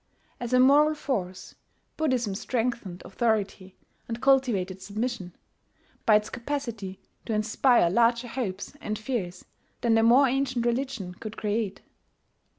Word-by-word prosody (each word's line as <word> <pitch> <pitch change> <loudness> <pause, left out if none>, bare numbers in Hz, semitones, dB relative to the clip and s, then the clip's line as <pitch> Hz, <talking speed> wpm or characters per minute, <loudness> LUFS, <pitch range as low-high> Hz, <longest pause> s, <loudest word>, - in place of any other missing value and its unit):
As 240 0 -5
a 255 - +4
moral 295 +4 +5
force, 195 -12 -4 0.4
Buddhism 255 -9 0
strengthened 225 -4 -3
authority 200 -3 -1 0.3
and 230 0 -4
cultivated 235 -9 +2
submission, 205 -2 -4 0.7
by 215 - +7
its 210 0 +1
capacity 235 -7 -4 0.3
to 225 - -1
inspire 215 0 +3
larger 235 +3 +3
hopes 210 -6 -4
and 215 0 -3
fears 205 -6 -4 0.4
than 235 -1 +2
the 225 - +4
more 245 +5 +6
ancient 260 -2 0
religion 240 -6 -2
could 215 +4 -9
create. 210 -1 -2
230 Hz, 125 wpm, -27 LUFS, 200-255 Hz, 0.7 s, by